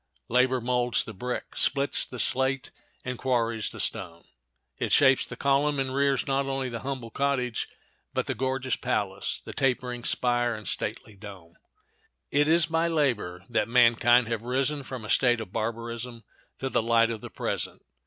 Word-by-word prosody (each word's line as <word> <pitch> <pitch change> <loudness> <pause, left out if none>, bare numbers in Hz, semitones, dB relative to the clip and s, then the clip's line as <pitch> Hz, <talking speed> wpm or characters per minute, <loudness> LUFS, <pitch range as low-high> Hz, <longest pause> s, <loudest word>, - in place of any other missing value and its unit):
Labor 125 +1 +3
molds 125 0 +1
the 115 - -9
brick, 125 +6 -5
splits 140 +1 +1
the 125 - -8
slate, 130 +2 +2 0.3
and 125 -1 -4
quarries 115 -4 0
the - - -9
stone. 85 -3 -3 0.6
It - - -2
shapes 135 -2 +5
the - - -7
column 140 +1 +2
and 130 -1 -1
rears 140 -1 +1
not 135 0 0
only 135 -1 -2
the 115 -1 -5
humble 130 -3 -5
cottage 130 -4 -1 0.4
but - - -1
the - - -2
gorgeous 130 -1 -1
palace, 100 -2 -2
the - - -7
tapering 125 -2 -1
spire 120 -1 +1
and 110 -1 -9
stately 110 0 -2
dome. 95 -5 -11 0.8
It 145 +1 +3
is 165 0 +5
by 165 +2 +1
labor 120 - -1
that 120 - 0
mankind 120 0 +5
have 115 -1 -2
risen 135 +4 0
from 130 -4 -7
a - - -6
state 120 +1 +3
of 105 -4 -8
barbarism 115 +1 -4 0.3
to 135 - -3
the - - +1
light 115 0 +3
of 110 -2 -5
the - - -8
present. - - -3
125 Hz, 170 wpm, -27 LUFS, 115-135 Hz, 0.8 s, shapes